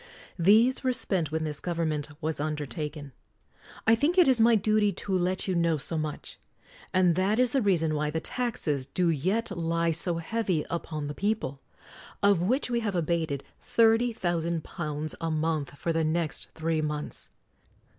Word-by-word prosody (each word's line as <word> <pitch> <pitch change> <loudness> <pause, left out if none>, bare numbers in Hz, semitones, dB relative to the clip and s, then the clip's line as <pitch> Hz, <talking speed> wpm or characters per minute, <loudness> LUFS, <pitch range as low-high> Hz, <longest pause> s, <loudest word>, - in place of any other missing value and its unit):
These 220 +10 +4
were 255 -1 +2
spent 185 - -1
when 160 0 -1
this 150 -2 -4
gov 175 -1 -3
ernment 155 -3 -1
was 155 -1 -2
undertaken. 150 0 -4 0.7
I 225 - +6
think 295 +10 +2
it 355 -5 +7
is 255 -4 +4
my 230 +1 +6
duty 215 0 +2
to 195 +1 -2
let 185 +2 0
you 190 - +1
know 170 -2 +2
so 155 +3 -4
much. 155 -1 -5 0.5
And 185 -2 +4
that 190 +5 +1
is 250 -1 +4
the 270 - +2
rea 200 -4 +3
son 160 -1 0
why 150 0 0
the 160 +2 -2
taxes 160 - -2
do 175 +3 +1
yet 190 +8 -1
lie 165 0 0
so 165 +2 +1
heavy 180 -2 -1
upon 155 -3 -3
the 145 - -4
people 200 -9 -2 0.3
— - - -18
of 200 -4 +4
which 250 +10 +1
we 240 -1 0
have 210 -4 -2
abated 160 -4 -1 0.2
£30,000 170 -9 0
a 165 - -1
month 155 -3 -1
for 165 +3 -1
the 165 0 +1
next 160 0 -1
three 160 -1 0
months. 150 -1 -5
170 Hz, 175 wpm, -28 LUFS, 155-205 Hz, 0.7 s, it